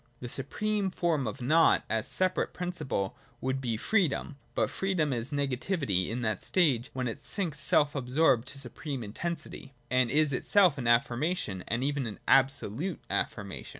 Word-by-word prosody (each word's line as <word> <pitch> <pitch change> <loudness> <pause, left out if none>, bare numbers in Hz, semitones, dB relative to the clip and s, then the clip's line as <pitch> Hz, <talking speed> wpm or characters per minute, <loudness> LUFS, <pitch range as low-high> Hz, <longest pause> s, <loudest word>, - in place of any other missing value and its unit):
— 120 - -37
The 125 - -6
supreme 205 - -1
form 165 -7 0
of 125 +4 -5
Nought 160 +6 +4
as 110 +1 -1
a - - -4
separate 185 -1 0
principle 175 - -3 0.2
would 130 +1 -2
be 115 -4 -1
Freedom: 160 - 0 0.2
but - - +1
Freedom 180 -7 0
is 120 +3 -3
negativity 140 - 0
in 120 +2 -3
that 110 -2 -1
stage, 140 -9 +2
when 130 -1 -2
it 120 +5 -5
sinks 170 -7 -3
self 145 +1 +3
absorbed 130 -2 +2
to 140 - -5
supreme 135 0 -5
intensity, 150 +4 -5 0.2
and 125 -2 +3
is 150 +1 +3
itself 175 +1 +4
an 120 - -2
affirmation, 120 - +1
and 120 +3 -1
even 135 -6 -2
absolute 135 - +2
affirmation. - - -3
135 Hz, 160 wpm, -29 LUFS, 120-165 Hz, 0.2 s, Nought